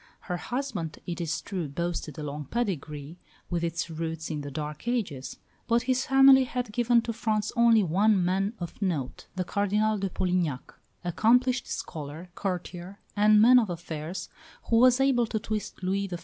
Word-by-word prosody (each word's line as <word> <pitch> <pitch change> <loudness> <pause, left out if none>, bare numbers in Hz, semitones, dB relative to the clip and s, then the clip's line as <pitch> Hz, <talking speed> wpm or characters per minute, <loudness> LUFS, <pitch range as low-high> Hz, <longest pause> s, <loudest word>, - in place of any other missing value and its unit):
Her 180 - -3
husband, 240 - -4
it 175 -1 -4
is 165 -2 -2
true, 185 -6 -4
boasted 165 0 -4
a 155 - -5
long 150 0 -5
pedigree, 160 - -4 0.3
with 170 -1 -1
its 165 0 -2
roots 165 0 -4
in 150 -1 -3
the 145 - -6
Dark 150 - -6
Ages; 185 - -2 0.3
but 235 0 +2
his 255 -1 0
family 270 0 +7
had 245 -2 -3
given 240 0 +3
to 230 - -3
France 215 -1 -1
only 235 -3 +5
one 190 +2 +3
man 195 +4 0
of 175 +3 -7
note, 160 -10 -2
that 185 -1 -2
Cardinal 210 +2 +1
de 195 0 -1
Polignac, 175 -7 -1 0.3
accomplished 245 +8 +2
scholar, 160 +2 -6
courtier, 180 0 -5 0.2
and 210 +1 +5
man 250 +3 +8
of 220 -5 0
affairs, 170 +1 -5 0.4
who 230 - +5
was 250 +1 +6
able 265 -4 +3
to 220 - -2
twist 215 -2 -4
Louis 195 +2 0
XIV. 175 -2 -5
190 Hz, 170 wpm, -27 LUFS, 165-230 Hz, 0.4 s, man